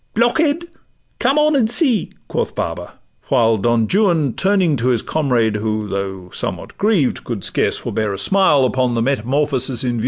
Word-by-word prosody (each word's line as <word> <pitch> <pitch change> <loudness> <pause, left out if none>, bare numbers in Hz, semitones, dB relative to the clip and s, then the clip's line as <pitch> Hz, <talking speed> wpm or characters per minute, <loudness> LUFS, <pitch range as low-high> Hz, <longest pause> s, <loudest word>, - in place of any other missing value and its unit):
'Blockhead! 290 +8 +1 0.5
come 265 +4 +2
on, 300 0 +3
and 235 -5 +2
see,' 245 - +2 0.2
quoth - - -3
Baba; - - -5 0.3
while 115 -4 +3
Don 115 +2 +1
Juan, 170 - +2
turning 190 -5 +1
to 120 +1 -1
his 120 -4 +1
comrade, 120 -8 0
who 110 0 -2
Though 95 -2 -5
somewhat - - -5
grieved, 200 - +1
could 115 -5 -5
scarce - - 0
forbear 110 -2 -3
a 100 - -4
smile 150 - +3
Upon 125 -1 0
the 115 - 0
metamorphosis 135 0 -1
in 125 - 0
view,— - - +1
'Farewell! 120 - -3
130 Hz, 175 wpm, -18 LUFS, -, 0.5 s, on